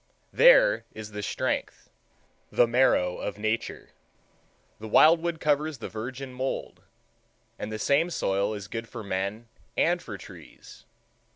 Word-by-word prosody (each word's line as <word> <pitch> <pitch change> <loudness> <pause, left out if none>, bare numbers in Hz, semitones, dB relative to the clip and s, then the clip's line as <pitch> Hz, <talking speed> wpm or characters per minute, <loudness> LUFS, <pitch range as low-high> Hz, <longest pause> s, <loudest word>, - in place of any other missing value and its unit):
There - - +6
is 110 -1 -8
the 105 0 -5
strength, - - -3 0.6
the 120 - +4
marrow, 115 -7 +2
of 105 - -5
Nature. 110 +2 -3 0.9
The 110 - -7
wild 160 +9 +6
wood 170 -1 -2
covers 150 0 0
the 115 - -7
virgin 130 +4 -6
mould,—and 125 -4 -8
the 110 - -3
same 145 +9 +2
soil 100 - -1
is 100 -2 -7
good 115 +2 -6
for - - -7
men 100 +4 -3 0.3
and - - +2
for - - -8
trees. - - -14
115 Hz, 130 wpm, -27 LUFS, 105-145 Hz, 0.9 s, There